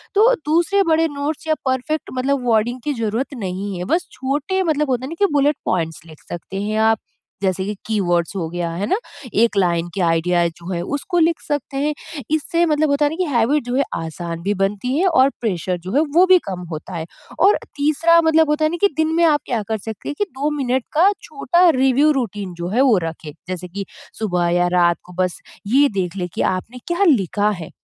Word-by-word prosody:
तो 450 +5 +6
दूसरे 345 +6 +3
बड़े 325 +1 +3
नोट्स 295 +2 -4
या 310 - +2
परफ़ेक्ट 260 +4 -1
मतलब 260 0 -1
वर्डिंग 230 +3 +1
की 295 - -1
ज़रूरत 230 +3 -2
नहीं 190 +1 -4
है। 180 - -4
बस 355 +2 0
छोटे 295 +8 -1
मतलब 300 -4 0
होता 255 0 0
है - - -6
ना 330 - -6
कि 395 - -1
बुलेट 290 +1 +3
पॉइंट्स 165 -3 -1
लिख 155 -2 -14
सकते 195 +3 -5
हैं 215 +1 -2
आप, 220 0 +4 0.5
जैसे 190 -1 0
कि 210 - -2
कीवर्ड्स 180 -4 0
हो 170 -4 -2
गया, 175 0 -3
है 180 +5 -3
ना? - - +3 0.4
एक 225 +1 +3
लाइन 175 -3 +1
की 195 - -2
आईडीईए 170 0 +2
जो 170 +2 -8
है, 170 -2 -2
उसको 285 - -2
लिख 330 0 +2
सकते 290 -2 -3
हैं। 295 +2 0 0.4
इससे 335 +2 +1
मतलब 310 -1 +2
होता 285 +1 +2
है - - +2
ना - - -4
कि 365 - 0
हैबिट 250 +6 +2
जो 245 0 -2
है 275 - +3
आसान 165 +1 -5
भी 200 +2 +1
बनती 210 +6 -1
है 370 - +2
और 275 -6 +4
प्रेशर 185 -5 -1
जो 185 - -4
है 290 - +5
वो 360 +2 +7
भी 370 -1 +6
कम 180 -1 -4
होता 155 +4 -7
है। 160 -1 -4 0.3
और 395 +4 +5 0.2
तीसरा 310 +4 +4
मतलब 320 -1 +3
होता 300 +1 +2
है 310 - +1
ना, 345 - -2
कि 405 - +6
दिन 315 0 +1
में 340 - +3
आप 300 -3 +3
क्या 235 -3 -1
कर 220 - 0
सकते 220 +1 -7
हैं 290 - -4
कि 415 - +2
2 285 +1 -2
मिनट 260 -2 0
का 360 +6 +5
छोटा 345 +5 +2
रिव्यू 270 +3 +4
रूटीन 205 -6 -4
जो 170 0 -5
है 230 +7 +2
वो 255 -7 +5
रखें। 160 -1 -7 0.2
जैसे 180 -1 -5
कि 195 +2 -6 0.3
सुबह 180 -5 0
या 175 - +3
रात 175 -1 +4
को 180 - -14
बस 180 -2 -3 0.3
ये 275 +6 +5
देख 180 0 -2
लें 180 -2 -2
कि - - -2 0.2
आपने 240 +7 -9
क्या 345 +3 +1
लिखा 210 - +2
है। - - -9
250 Hz, 225 wpm, -20 LUFS, 185-305 Hz, 0.5 s, वो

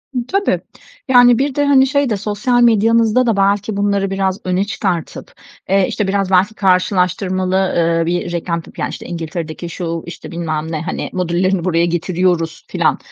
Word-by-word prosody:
E, - - -1
tabii. 395 +1 0 0.5
Yani, 245 -2 +6
bir 275 0 -1
de, 290 - +1
hani, 270 -2 +5
şey 280 -2 +1
de 215 - 0
sosyal 210 +4 0
medyanızda 230 +1 +3
da 225 -4 +1
belki 200 +1 +1
bunları 200 -1 0
biraz 195 0 -1
öne 185 +1 +1
çıkartıp, 185 -5 -4 0.4
eee, 195 -1 +3
işte, 210 - -2
biraz 195 -1 -1
belki 190 +4 +3
karşılaştırmalı, 185 0 +1
eee, 165 0 +1
bir 175 +1 -2
reklam 170 -1 -2
tipi, - - -11
ya, - - 0
işte, - - -8
İngiltere'deki 170 0 -5
şu, 165 -1 -4
işte, 170 - -9
bilmem 160 -2 -3
ne, 155 - -3
hani, 165 - -4
modüllerini 180 0 0
buraya 170 -2 +2
getiriyoruz 170 -1 -1
filan, - - +1
190 Hz, 170 wpm, -17 LUFS, 170-210 Hz, 0.5 s, Yani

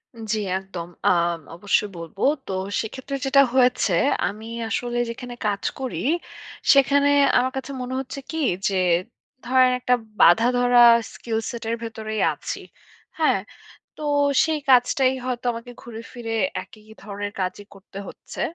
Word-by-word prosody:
উম 225 - -9
জি 215 - 0 0.2
একদম 185 -3 -7 0.2
আম 170 -1 +2 0.2
অবশ্যই 205 +2 +1
বলবো 170 +4 -9 0.3
তো - - -4 0.3
সেক্ষেত্রে 260 +5 -6
যেটা 275 +1 +5
হয়েছে, 250 -7 +3 0.3
আমি 215 +2 -7 0.2
আসলে 240 +1 -2
যেখানে 245 +1 -7
কাজ 200 -1 -1 0.2
করি 260 -2 -4 0.8
সেখানে 280 +1 +4 0.3
আমার 255 +1 +1
কাছে 265 +1 -5
মনে 250 +1 -5
হচ্ছে 270 +1 -6
কী 320 - -4 0.3
যে 195 - -1 0.7
ধরেন 255 0 +4
একটা 250 0 +1 0.3
বাঁধাধরা 245 +6 +5 0.3
স্কিল 225 -2 -4
সেট 235 -1 -6
এর 230 - 0
ভেতরেই 220 -1 -4
আছি। - - -6 0.6
হ্যাঁ, - - +3 0.6
তো 305 - -7 0.4
সেই 315 -2 -1
কাজটাই 255 +1 +4
হয়তো 250 -1 -3
আমাকে 235 +2 -8
ঘুরে 230 -2 -8
ফিরে 230 -2 -5 0.3
একই 215 -2 -18 0.2
ধরনের 205 0 -5
কাজই 185 +2 -3
করতে 195 0 -14
হচ্ছে। - - -9
235 Hz, 140 wpm, -23 LUFS, 205-255 Hz, 0.8 s, যেটা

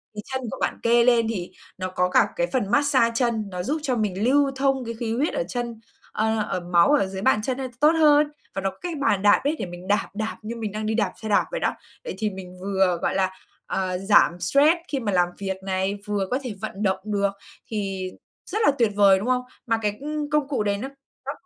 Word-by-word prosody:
thì 210 - -4
chân 260 - -1
của - - -5
bạn - - -1
kê 235 0 +5
lên 235 -2 +4
thì 185 -6 -4 0.3
nó 185 -1 -3
có 180 0 0
cả - - +4
cái - - 0
phần 225 - -1
mát 285 0 +3
xa 235 -5 +3
chân, 230 -3 0
nó 180 -1 -4
giúp 300 - -1
cho 265 -4 0
mình 210 -3 -1
lưu 275 +2 +3
thông 270 -2 +1
cái 230 - -4
khí 225 -2 -2
huyết 285 +6 0
ở - - 0
chân, 240 -2 -4 0.3
ờ, 220 +1 0
ở - - -1
máu 175 +4 +3
ở 295 -9 +4
dưới 190 0 -6
bàn 215 -1 +3
chân, 255 +2 -1
ơ, 265 -1 -3
tốt 300 +3 +6
hơn 300 -2 +5 0.3
và 195 - -2
nó 195 - 0
có 190 - -21
cái 350 -2 -4
bàn 275 -9 +1
đạp 205 0 +5
ấy, 290 +3 +1
để - - -2
mình 175 +1 -9
đạp, 205 +1 +1
đạp 220 +2 -3
như 225 +2 -5
mình 220 -3 -4
đang 215 +1 -4
đi 220 - 0
đạp 230 - +1
xe 220 - -3
đạp 205 - +3
vậy - - -2
đó. - - 0 0.3
Vậy - - -5
thì 215 +1 0
mình 185 -2 -9
vừa, 190 -2 +1
gọi - - 0
là, 190 -1 +1 0.3
ờ, 185 -1 -2
giảm 195 -3 +4
stress 280 - +4
khi 275 - -2
mà 210 -4 -2
làm 180 -1 +3
việc 190 -1 -3
này, 190 +1 -1
vừa 205 -2 -1
có 255 - +1
thể 250 -4 -4
vận 200 - -4
động 190 -1 +1
được 200 -2 0 0.4
thì 195 -3 -3 0.4
rất 420 - -3
là - - +6
tuyệt 230 -3 +3
vời, 200 -2 +6
đúng 205 - -4
không? 255 0 +2 0.3
Mà 225 -1 +1
cái 210 -1 +1
công 300 0 -3
công 300 -2 +1
cụ 265 -7 -1
đấy 200 -1 0
nó 255 +6 -4 0.4
nó - - -2
215 Hz, 255 wpm, -24 LUFS, 195-260 Hz, 0.4 s, tốt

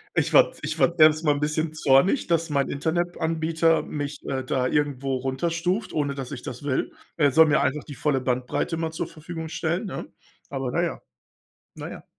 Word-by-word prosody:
Ich - - +1
war - - +6
ich - - -3
war 170 +1 +2
erst 155 +1 +6
mal 150 - +4
'n 145 - -4
bisschen 155 +1 -1
zornig, 155 - +3
dass 165 -1 0
mein 140 -2 +1
Internetanbieter 165 +1 0
mich, 145 0 -5
äh, 130 -1 -2
da 130 0 0
irgendwo 140 -1 0
runterstuft, 170 - -1
ohne 145 -2 -1
dass 135 -2 -6
ich 130 -3 -6
das 125 +3 -7
will. 140 -2 -1 0.2
Er 145 -3 +4
soll 160 +3 +7
mir 150 0 +3
einfach 145 +2 0
die 145 - -9
volle 135 0 0
Bandbreite 125 +6 -1
immer 165 -1 -2
zur 160 - -4
Verfügung 160 0 -7
stellen, 170 +5 -2
ne? - - -6 0.4
Aber - - -3
na - - 0
ja, - - -2 0.7
na - - -7
ja. - - -10
150 Hz, 190 wpm, -25 LUFS, 140-165 Hz, 0.7 s, soll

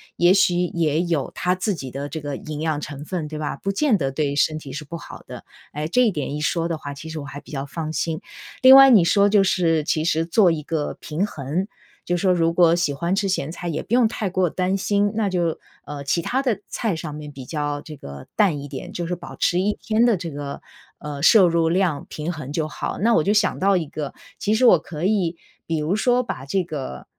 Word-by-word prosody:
也 175 +1 +5
许 185 -2 +3
也 170 -3 +1
有 170 -5 -1
它 180 - +1
自 185 +2 -1
己 135 -6 -7
的 140 +2 -5
这 160 +2 -6
个 145 -1 -4
营 155 -1 -6
养 155 -2 0
成 145 -1 -7
分， 170 -4 -3
对 155 0 -6
吧？ 150 -2 -3
不 195 - -2
见 265 -1 +2
得 135 -6 -1
对 145 0 -1
身 155 0 +2
体 145 -3 -9
是 145 +3 -6
不 170 - -7
好 - - -11
的。 - - -9 0.3
哎， 150 +1 -3
这 250 +9 +2
一 225 - +3
点 145 -4 -3
一 - - -3
说 165 +2 0
的 165 - -2
话， 145 -2 -7
其 150 +3 -9
实 160 0 -5
我 145 - -7
还 145 0 -8
比 - - -15
较 135 -2 -4
放 155 +2 -5
心。 160 -1 -2 0.4
另 260 +1 +10
外 270 0 +9
你 215 -8 +7
说 200 +4 +4
就 200 -1 +4
是 165 -5 +2
其 155 +1 0
实 165 -1 +1
做 180 +2 +4
一 155 -2 -3
个 150 -1 -2
平 160 +6 -1
衡。 155 +4 -3 0.4
就 175 0 0
说 185 +1 +2
如 165 -1 +2
果 170 -1 +5
喜 170 -4 0
欢 170 +6 -1
吃 195 -1 0
咸 160 -5 -1
菜 175 +1 -6
也 160 - -2
不 225 - -6
用 245 -2 +5
太 215 -4 -3
过 185 -2 +1
担 185 +3 0
心， 205 +1 +1
那 215 -2 0
就， 175 -3 -1 0.3
呃， 145 -1 -6
其 165 +4 0
他 265 +2 0
的 240 -8 0
菜 220 -7 -2
上 160 -2 -6
面 150 0 -8
比 135 -2 -10
较 145 0 -3
这 155 - -10
个 70 - -10
淡 195 -9 +2
一 145 - -7
点， 135 -1 -7
就 175 - -3
是 180 - -2
保 175 - -10
持 175 - +1
一 205 +3 +1
天 225 +2 +2
的 225 -5 +3
这 170 -3 -6
个， 140 0 -6 0.4
呃， 145 -1 -7
摄 195 +5 +7
入 165 -1 +2
量 170 -5 0
平 155 +3 -4
衡 150 -4 -7
就 155 0 -1
好。 150 - -4
那 230 +5 +2
我 160 - +3
就 205 - +1
想 210 -2 +2
到 195 0 +3
一 165 - -2
个， 145 -1 -6 0.2
其 215 +2 +1
实 255 - +3
我 180 -9 +7
可 155 0 -7
以 185 -5 +1 0.3
比 165 - -1
如 155 +5 0
说 245 +3 +2
把 135 - -6
这 185 +7 0
个 140 - -6
165 Hz, 270 characters per minute, -22 LUFS, 150-190 Hz, 0.4 s, 另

